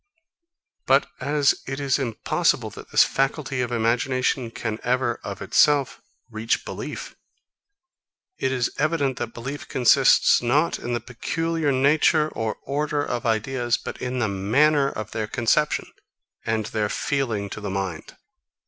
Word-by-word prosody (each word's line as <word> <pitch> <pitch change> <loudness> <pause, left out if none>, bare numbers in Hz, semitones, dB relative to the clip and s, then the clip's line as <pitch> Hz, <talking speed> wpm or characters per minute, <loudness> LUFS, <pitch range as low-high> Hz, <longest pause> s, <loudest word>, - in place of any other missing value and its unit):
But - - +3
as 145 0 +2
it 135 +1 -4
is 140 -1 +1
impossible 120 -5 0
that - - -11
this - - +6
faculty 135 -1 -1
of 125 -1 -2
imagination 120 +2 0
can 110 -1 -4
ever, 125 -1 0
of 100 -1 -6
itself, 140 +6 +3 0.3
reach 110 +1 -1
belief, - - -6 1.2
it 130 - 0
is 125 -2 0
evident 145 -4 +1
that 120 -1 -5
belief 135 +5 -6
consists 125 -2 +4
not 140 +7 +1
in 120 - -4
the 120 - -3
peculiar 160 +6 -2
nature 150 +3 +3
or 110 -5 -3
order 145 +1 -1
of 120 0 -3
ideas, 120 +2 0
but - - -8
in 125 0 -3
the 120 -3 +1
manner 135 +9 +2
of 110 -4 -6
their 110 -1 -3
conception, 130 +7 +1 0.6
and 110 -1 0
in - - -8
their 105 -2 0
feeling 115 -8 -1
to 105 - -6
the 105 - -4
mind. 95 -4 -4
125 Hz, 145 wpm, -24 LUFS, 115-140 Hz, 1.2 s, this